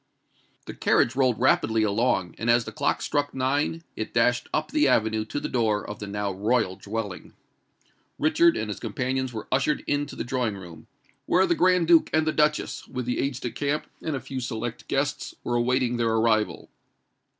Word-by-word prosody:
The - - -7
carriage 120 - +2
rolled 130 -4 +2
rapidly 110 0 +3
along; 100 -4 +1
and 115 - -1
as 120 0 +4
the - - -6
clock - - -1
struck 145 -1 -1
nine 145 +5 0
it 110 - -5
dashed 125 +1 +2
up 155 0 -1
the 150 -1 +3
avenue 110 -3 +2
to 145 - -4
the - - -3
door 110 -4 0
of 105 - -7
the 105 - -6
now 100 0 -2
royal 105 0 0
dwelling. 105 -2 -6 0.8
Richard 160 +2 +3
and 110 -1 -3
his 105 - -5
companions 130 +3 -2
were 110 -2 -7
ushered 140 +3 +1
into 145 0 -1
the - - -3
drawing 120 -5 -1
room, 85 -4 -12 0.4
where 185 +2 +4
the 175 - +2
Grand 180 0 +3
Duke 170 -1 +5
and 155 0 +3
the 155 - +1
Duchess, 150 -4 0
with 125 -1 -4
the 125 - -1
aides 135 -2 -1
de 120 - -3
camp, 145 +5 -2 0.2
and 160 -3 -2
a - - -2
few 130 +1 -6
select 120 -2 -5
guests, 145 +1 -2
were 120 - -2
awaiting 125 0 +1
their 115 -1 +1
arrival. 110 -1 +1
125 Hz, 190 wpm, -26 LUFS, 110-145 Hz, 0.8 s, Duke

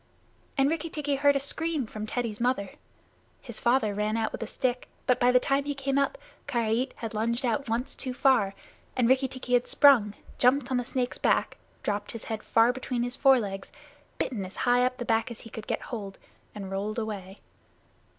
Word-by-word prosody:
And 270 0 +4
Rikki 330 +2 -1
tikki 295 -2 -2
heard 285 0 +4
a - - +3
scream 310 0 -1
from 215 0 -6
Teddy's 230 -2 -3
mother. 240 -6 0 0.7
His 235 -4 -8
father 235 -3 +2
ran 210 +2 0
out 220 -1 0
with - - -6
a 225 - -3
stick, 250 0 -2 0.2
but 250 - +3
by 245 0 +5
the 250 - +6
time 275 +2 +1
he 285 0 -2
came 275 0 0
up, 280 - 0 0.3
Karait 235 -1 0
had 225 -1 -5
lunged 235 +4 0
out 245 +2 -1
once 235 +3 -1
too 260 - -4
far, 245 -7 +3 0.4
and 245 -2 +3
Rikki 260 +2 +4
tikki 255 -1 -5
had 245 0 +3
sprung, 240 -8 +5 0.2
jumped 255 +1 +3
on 255 - +2
the 245 - -1
snake's 250 -2 -2
back, - - +1 0.3
dropped 205 0 -2
his 230 - -7
head 220 -1 -4
far 230 +2 +4
between 255 -2 -2
his 245 0 -2
forelegs, 215 -8 +2 0.5
bitten 220 -7 -2
as 185 +1 -8
high 245 0 +4
up 255 0 -5
the 240 - -4
back 225 +2 +1
as 235 - -8
he 225 - -12
could 220 - -8
get - - -1
hold, 200 -5 -6 0.4
and 195 -2 -6
rolled 205 +3 -3
away. 200 -4 -5
245 Hz, 200 wpm, -28 LUFS, 215-265 Hz, 0.7 s, the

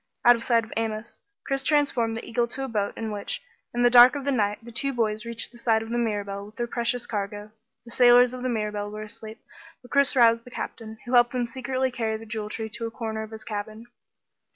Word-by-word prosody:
Out 240 0 +8
of 230 - -6
sight 230 -2 +3
of 220 - -10
Amos, 225 0 -3 0.3
Chris 275 -1 -1
transformed 265 -6 +1
the - - -7
eagle 235 +1 0
to 270 +3 -5
a - - -2
boat 210 -4 -2
in 225 -1 -4
which, 210 - -3 0.3
in 240 0 0
the 245 - +6
dark 245 +2 +9
of 280 -1 -4
the 280 - +1
night, 210 -5 +1
the 235 - -10
two 275 +4 +1
boys 220 -2 -1
reached 235 0 -3
the 240 - -14
side 225 -1 +2
of 225 - -9
the 240 - 0
Mirabelle 205 -3 -2
with 215 - -16
their 240 - -2
precious 235 0 -1
cargo. 205 0 -4 0.3
The 235 - -12
sailors 245 0 +6
of 255 - -6
the 255 - -1
Mirabelle 210 -3 -2
were 215 +1 -6
asleep, 220 0 -10 0.4
but 245 - -16
Chris 280 0 +3
roused 230 -2 +5
the 245 - -12
Captain, 220 -2 -7
who 240 - -5
helped 240 0 +5
them 250 -1 0
secretly 260 +2 -2
carry 225 -3 -2
the 225 - -11
Jewel 215 -1 -5
Tree 220 +1 -4
to 230 +1 -4
a - - -5
corner 220 -1 -4
of 220 - -7
his 220 -1 -10
cabin. 215 +1 -6
230 Hz, 245 wpm, -26 LUFS, 220-245 Hz, 0.4 s, dark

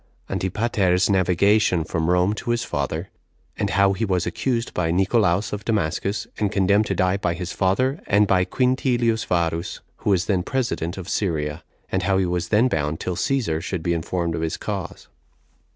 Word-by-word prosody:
Antipater's 95 -2 +1
Navigation 95 -1 +3
From 80 0 -2
Rome 90 +3 +3
To 110 - -6
His 120 0 +1
Father; - - -3 0.4
And - - -1
How 100 +2 +3
He 95 - -3
Was 95 -5 0
Accused 115 +7 -2
By 85 -2 0
Nicolaus 95 +2 +2
Of 105 - -4
Damascus 100 -1 -1
And 105 -2 +1
Condemned 100 +2 +3
To - - -1
Die 95 +1 +2
By 90 -4 -1
His 90 0 -5
Father, 130 - +1
And 105 +2 +4
By 95 -2 +3
Quintilius 120 0 +1
Varus, 85 -1 -1 0.2
Who - - -3
Was 95 -2 +2
Then 95 -4 +1
President 100 -7 -2
Of 95 -2 -7
Syria; 80 -6 -2 0.3
And 95 - +1
How 95 +1 +1
He 95 - +2
Was 90 -1 -1
Then 110 +4 +4
Bound 75 -7 -1
Till 90 - -3
Cæsar 95 -6 0
Should 90 -1 -4
Be 85 - +1
Informed 85 +1 -2
Of - - -3
His 80 -1 -2
Cause. - - -5
95 Hz, 180 wpm, -23 LUFS, 85-105 Hz, 0.4 s, And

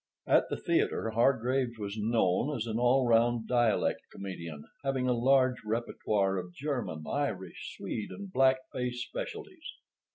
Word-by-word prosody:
At - - +4
the - - -2
theater 115 - 0
Hargraves 125 +1 +2
was 100 -1 -4
known 115 +5 +1
as 115 - -2
an 115 0 -2
all 125 +2 +4
round 115 0 +3
dialect 120 -3 +2
comedian, 85 -6 -7 0.2
having 135 -2 0
a 125 - +3
large 130 +1 +3
repertoire 105 -3 0
of 90 -1 -8
German, 130 - -3
Irish, 95 -11 -3
Swede, 110 - -4
and 200 -2 -8
black 130 0 +5 0.2
face 125 -1 -2
specialties. 375 - -7
120 Hz, 140 wpm, -30 LUFS, 105-130 Hz, 0.2 s, black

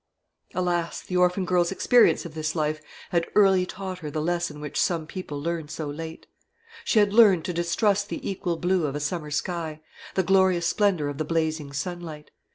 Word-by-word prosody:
Alas! 175 -2 -1
the 180 - -6
orphan 180 +1 +2
girl's 175 -1 +2
experience 235 +1 +4
of 165 - -8
this 155 0 -3
life 155 -1 -1 0.3
had 170 -1 +1
early 190 -3 +5
taught 190 -1 -6
her 155 -4 -6
the 155 - -3
lesson 170 -1 -1
which 150 -1 -2
some 165 -3 0
people 155 -4 -6
learn 165 0 -3
so 155 0 -5
late. 160 +2 -7 0.6
She - - +1
had 205 -1 +4
learnt 205 -7 +6
to 180 - -2
distrust 200 +4 +1
the - - -5
equal 180 -3 -2
blue 180 -2 +1
of 140 - -4
a - - -2
summer 150 +1 -3
sky, 160 0 -3 0.4
the 190 - +2
glorious 190 -1 +3
splendour 185 -5 +2
of 145 0 -5
the - - +1
blazing 155 -2 -1
sunlight. 165 0 -6
170 Hz, 185 wpm, -25 LUFS, 155-185 Hz, 0.6 s, learnt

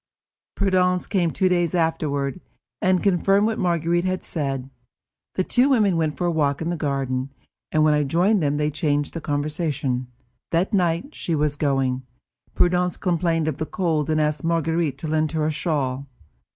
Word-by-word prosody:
Prudence 180 -2 +2
came 180 -4 +1
two 185 +4 +1
days 175 -1 +1
afterward, 160 -2 -1 0.4
and 185 -1 +2
confirmed 195 +1 +3
what 225 0 -1
Marguerite 170 -1 +1
had 185 0 -2
said. 135 -4 -3 0.6
The 185 - +1
two 250 +8 +3
women 210 -9 +3
went 160 -2 0
for 180 - -1
a 175 - +2
walk 145 -3 +1
in 165 +1 -2
the - - -1
garden, 135 -3 -2 0.4
and 155 -1 +3
when 155 -1 +4
I 150 - +2
joined 180 +8 +2
them 145 -1 +1
they 150 0 0
changed 145 -1 -1
the 165 - -5
conversation. 145 -4 -2 0.4
That 175 +6 0
night, 175 - +1
as - - -21
she 165 - -1
was 150 -1 0
going, 135 -3 0 0.5
Prudence 180 0 +2
complained 170 -3 0
of 155 - -1
the 155 - -2
cold 160 -5 -1
and 155 0 +2
asked 150 -1 0
Marguerite 165 -3 0
to 155 - -5
lend 155 0 0
her 155 -1 0
a 155 - +1
shawl. 140 -4 -2
160 Hz, 180 wpm, -23 LUFS, 145-180 Hz, 0.6 s, when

